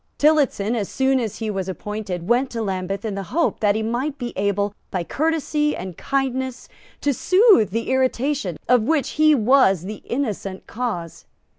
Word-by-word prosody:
Tillotson, 285 -8 +2
as 210 -4 -2
soon 265 0 +2
as 225 -5 -3
he 220 -2 -3
was 190 -2 -3
appointed, 190 -3 -5
went 245 +3 +2
to 230 -1 -3
Lambeth 195 +1 -3
in 215 - -2
the 195 - -3
hope 335 0 0
that 205 -1 +2
he 220 - -1
might 255 +6 -2
be 245 -3 -5
able, 200 +1 0 0.2
by 180 -2 -2
courtesy 300 - 0
and 185 -1 -6
kindness, 260 0 -2 0.3
to 285 - +1
soothe 370 - +5
the 230 +5 -2
irritation 260 - 0
of 250 -2 +5
which 280 +2 +1
he 310 0 +4
was 225 - +4
the 205 +2 -7
innocent 210 -7 -3
cause. 210 -9 -5
235 Hz, 170 wpm, -22 LUFS, 200-275 Hz, 0.3 s, soothe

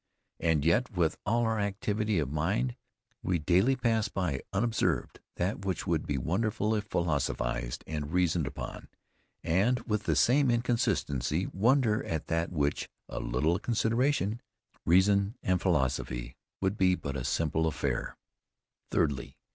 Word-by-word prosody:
And 80 -3 +1
yet 115 +10 +3
with 85 -2 +2
all 120 +2 +2
our 110 -1 0
activity 105 +1 -1
of 70 -4 -1
mind, 70 -5 0 0.5
we 90 - +1
daily 90 - +3
pass 115 -3 +1
by 90 -9 -2
unobserved 95 - 0 0.2
that 95 +2 -2
which 95 -4 -2
would - - 0
be 75 - -1
wonderful 105 - 0
if 105 -1 -1
philosophised 70 - -1
and 75 -1 -4
reasoned 90 -4 +2
upon, - - -7 0.6
and 105 +10 +2
with 105 -2 -2
the - - +2
same 135 +2 +4
inconsistency 95 - 0
wonder 115 +1 +3
at 80 -1 -3
that 85 +1 0
which 75 -4 -1 0.2
a - - -4
little 75 +9 0
consideration, 115 -1 +1 0.5
reason 100 +5 +4
and 90 -1 +1
philosophy 65 -7 0 0.3
would 95 +2 0
be 90 -1 +4
but 70 -5 -5
a 65 - -3
simple 80 +3 +1
affair. 70 -5 -2 0.7
_Thirdly. 70 -5 0
90 Hz, 140 wpm, -30 LUFS, 75-110 Hz, 0.7 s, same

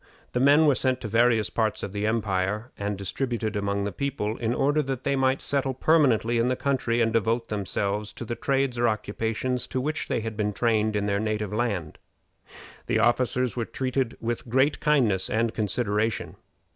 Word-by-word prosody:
The 125 - -1
men 145 +4 +5
were 145 - +5
sent 130 -1 0
to 110 - -4
various 115 0 +3
parts 110 -2 -1
of 100 - -5
the 105 +1 -1
empire, 105 +1 -1
and 100 0 -3
distributed 110 +2 -2
among 100 0 -1
the 100 - -2
people, 115 -3 -2
in 115 -1 -1
order 145 +4 +2
that 135 -3 -4
they 140 - +1
might 130 0 +1
settle 135 -2 0
permanently 125 -6 +3
in 115 - +2
the 130 - +1
country, 125 -4 0
and 115 -1 +2
devote 115 +1 0
themselves 100 +1 -2
to 120 - -7
the 120 - -3
trades 135 -1 0
or 120 - +3
occupations 115 +3 -2
to 130 - -2
which 150 +4 -2
they - - -1
had 110 0 -5
been 105 -1 -1
trained 110 -1 +1
in 100 -1 0
their 100 -1 0
native 105 -1 -2
land. 100 -9 -2 0.9
The - - +1
officers 125 0 +1
were 120 -2 -1
treated 130 -1 -2
with 120 +1 -4
great 135 +5 +2
kindness 120 -11 +2
and 115 0 0
consideration. 110 0 -1
115 Hz, 185 wpm, -26 LUFS, 105-130 Hz, 0.9 s, men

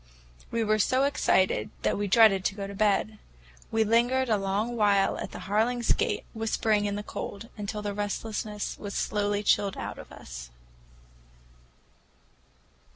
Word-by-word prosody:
We 230 -1 0
were 215 0 +2
so 255 +5 +3
excited 210 -8 +2
that - - +2
we 205 0 -1
dreaded 200 -2 +5
to 195 - 0
go 200 -1 -4
to 200 - -7
bed. 210 +1 +1 0.5
We 225 0 +2
lingered 240 +4 +2
a 215 - +3
long 200 +5 -1
while 205 -3 +3
at - - -5
the - - -8
Harlings' 230 +5 +1
gate, - - -1
whispering 220 -2 +1
in 200 0 -1
the 205 - -4
cold 210 +2 -6
until 210 0 -5
the 205 -1 -2
restlessness 210 0 -3
was 205 -1 -6
slowly 205 0 0
chilled 200 -1 +2
out - - -5
of - - -11
us. - - -9
210 Hz, 155 wpm, -28 LUFS, 200-225 Hz, 0.5 s, dreaded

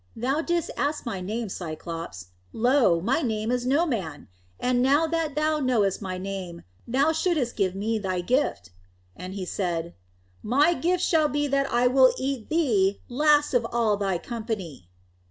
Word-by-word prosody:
"Thou 265 +7 0
didst 345 0 -1
ask 290 +1 -2
my 195 -6 -4
name, 220 +5 -3
Cyclops. 165 - -6 0.2
Lo! 240 -7 +3
my 265 - +1
name 220 -3 -1
is 250 0 -1
No 290 +6 +3
Man. 190 - -4 0.3
And 250 0 +1
now 280 +5 +4
that 320 -2 -2
thou 305 0 +1
knowest 230 -9 +1
my 185 -2 -4
name, 185 -3 -6 0.2
thou 275 +6 +2
shouldst 320 -7 0
give 190 -3 0
me 220 +3 -1
thy 185 -3 -2
gift." 175 - -1 0.4
And 185 +2 -8
he 190 -2 -4
said, 170 -2 -3 0.5
"My 285 +9 +3
gift 355 +1 0
shall 315 -3 +3
be 290 +1 -1
that 275 0 0
I 240 +1 +2
will 255 +1 +5
eat 265 -4 -3
thee 215 - +2
last 295 +3 +3
of 245 -2 +3
all 230 -3 +2
thy 195 -3 -1
company." 200 - -6
240 Hz, 165 wpm, -25 LUFS, 190-290 Hz, 0.5 s, will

